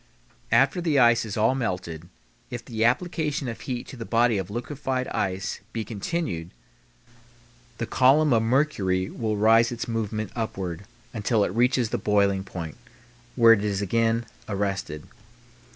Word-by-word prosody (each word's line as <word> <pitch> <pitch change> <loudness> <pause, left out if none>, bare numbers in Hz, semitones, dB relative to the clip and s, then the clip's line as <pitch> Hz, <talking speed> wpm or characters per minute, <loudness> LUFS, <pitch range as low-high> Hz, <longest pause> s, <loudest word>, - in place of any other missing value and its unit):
After 180 - +3
the 160 -4 +1
ice 120 -2 +5
is 105 0 -5
all 110 +4 +3
melted, 90 -9 -4 0.4
if 120 -1 -6
the 110 -3 -2
application 150 +2 0
of 115 - -6
heat 125 -2 -4
to - - -8
the 120 - -6
body 115 -2 +2
of 95 0 -5
liquefied 130 +3 -3
ice 95 0 -2
be 115 - -2
continued, 100 - -3 1.3
the 115 - -2
column 135 +5 +4
of 115 - +4
mercury 110 -7 +1
will 110 -3 -2
resume 115 +3 +4
its 120 - -5
movement 110 -2 -3
upward 100 -5 -4 0.3
until 110 -1 +1
it - - 0
reaches 120 0 +2
the - - -1
boiling 100 -2 +2
point, 85 -5 -7 0.6
where 115 -2 +7
it 105 -2 0
is 100 -2 -1
again 115 +3 +1 0.2
arrested. 100 -7 -2
115 Hz, 150 wpm, -25 LUFS, 100-125 Hz, 1.3 s, where